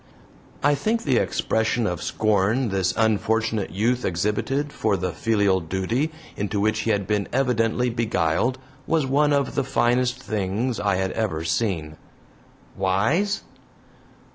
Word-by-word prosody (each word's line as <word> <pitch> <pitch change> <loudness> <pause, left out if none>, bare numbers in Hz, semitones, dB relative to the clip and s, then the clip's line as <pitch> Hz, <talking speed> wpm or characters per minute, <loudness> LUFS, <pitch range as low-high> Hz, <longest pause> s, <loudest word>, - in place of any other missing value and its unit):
I 145 +1 +5
think 220 +11 0
the 130 -4 +2
expression 110 +1 0
of 90 -5 -2
scorn 110 +4 +1
this 95 -2 +1
unfortunate 110 0 +1
youth 115 +8 0
exhibited 105 +11 -1
for 105 -3 0
the 90 0 -2
filial 100 +1 +2
duty 95 - -1 0.2
into 100 0 -2
which 110 +1 +1
he 110 - -1
had 100 -3 +1
been 105 0 0
evidently 125 -1 +1
beguiled 115 0 0 0.3
was 160 -4 +2
one 145 +3 +2
of 140 -2 +1
the 140 - 0
finest 120 -1 +1
things 110 +3 -2
I 100 -1 +1
had 95 0 -1
ever 95 -8 -2
seen. 80 -3 -1 0.8
"Wise?" 110 - +1
110 Hz, 135 wpm, -24 LUFS, 95-125 Hz, 0.8 s, I